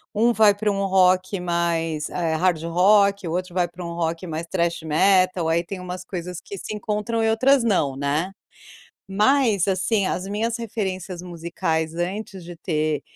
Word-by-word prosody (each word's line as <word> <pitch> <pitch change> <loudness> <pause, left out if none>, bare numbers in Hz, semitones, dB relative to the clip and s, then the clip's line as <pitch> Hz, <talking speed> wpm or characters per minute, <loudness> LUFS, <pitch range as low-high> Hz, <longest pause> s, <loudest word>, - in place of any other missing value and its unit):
um 230 +3 +4
vai 215 -3 +5
pra 210 0 0
um 195 0 -1
rock 185 0 +3
mais, 165 -3 -1
eh, 165 -3 -1
hard 170 -1 +1
rock, 200 +2 +3
o - - -3
outro 180 0 -3
vai 180 -1 +1
pra 175 +1 -9
um 170 - -5
rock 170 +1 -2
mais 165 0 -5
thrash 170 -3 0
metal. 185 +1 +3
Aí 170 +1 +1
tem 185 +1 -6
umas 180 0 -6
coisas 180 -2 -6
que 200 - -9
se 215 - -6
encontram 210 +2 -2
e 225 - +2
outras 260 +5 +4
não, 155 -11 +1
né. 150 +7 -1 0.8
Mas, 215 -2 +3
assim, 195 +1 +1
as 185 - -2
minhas 225 +3 -1
referências 195 -5 -4
musicais 165 -2 -3
antes 185 +1 -4
de 175 - -8
ter 155 -3 -1
185 Hz, 175 wpm, -23 LUFS, 170-205 Hz, 0.8 s, vai